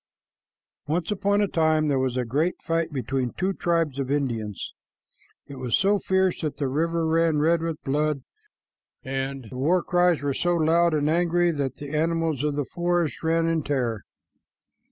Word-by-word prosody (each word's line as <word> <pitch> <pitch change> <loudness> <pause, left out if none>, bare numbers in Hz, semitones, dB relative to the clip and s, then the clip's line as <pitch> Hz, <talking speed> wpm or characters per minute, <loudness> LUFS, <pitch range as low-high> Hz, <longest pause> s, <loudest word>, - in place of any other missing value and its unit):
Once 165 +5 -1
upon 200 0 +1
a 205 - +2
time 160 -3 +2
there 140 -2 +1
was 130 -1 -1
a 125 - 0
great 150 +9 0
fight 165 -1 -1
between 130 -1 -2
two 190 +2 -1
tribes 165 -6 0
of 135 -1 -2
Indians. 115 - -2 0.7
It 140 - -10
was 125 -2 +1
so 200 +1 +2
fierce 190 -1 +1
that 150 -3 -3
the 140 - -1
river 165 +4 0
ran 165 -1 +2
red 160 +3 +2
with 165 -2 -4
blood, 150 0 0 0.8
and 135 0 -3
the 125 - -7
war 170 +7 +2
cries 175 -4 +2
were 140 -1 0
so 175 +5 +1
loud 165 +1 +3
and 150 -1 +1
angry 175 +1 +2
that 140 -4 -2
the 145 +1 -6
animals 165 -2 0
of 150 -1 0
the 145 -1 -1
forest 175 -1 -1
ran 165 0 +1
away 165 - +1
in 160 - 0
terror. 125 -7 -1
155 Hz, 175 wpm, -25 LUFS, 135-170 Hz, 0.8 s, loud